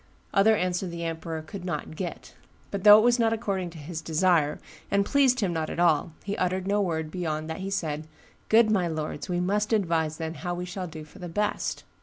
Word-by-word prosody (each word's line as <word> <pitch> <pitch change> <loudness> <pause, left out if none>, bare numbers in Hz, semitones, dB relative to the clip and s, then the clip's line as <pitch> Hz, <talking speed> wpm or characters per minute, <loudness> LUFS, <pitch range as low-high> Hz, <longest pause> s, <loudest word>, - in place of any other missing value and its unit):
Other 220 +3 +5
answer 180 -1 -1
the 170 -1 -5
emperor 165 -1 -4
could 185 +3 -8
not 180 -3 -4
get; 175 0 -6 0.4
but 200 -2 -3
though 210 0 +10
it 215 - +4
was 240 +1 +4
not 225 -1 +3
according 195 -5 -2
to 165 - -12
his 160 +2 -6
desire, 160 -2 +2 0.3
and 200 0 +2
pleased 260 0 +3
him 185 -4 0
not 160 -1 -2
at - - -5
all, 165 -2 +3
he 200 0 -3
uttered 185 +1 0
no 205 +1 +2
word 160 -4 -2
beyond 155 -3 -3
that 160 - -5
he 190 +1 -4
said, 155 -5 -2 0.4
'Good 220 0 +5
my 185 -5 +2
lords, 155 0 -4
we 175 -1 0
must 205 +4 0
advise, 165 -6 +1
then, 160 -1 -4
how 175 -1 -2
we 180 +1 -4
shall 180 0 -5
do 160 -1 -8
for 150 - -15
the 175 -1 -6
best. 210 +5 -1
180 Hz, 220 wpm, -27 LUFS, 160-200 Hz, 0.4 s, though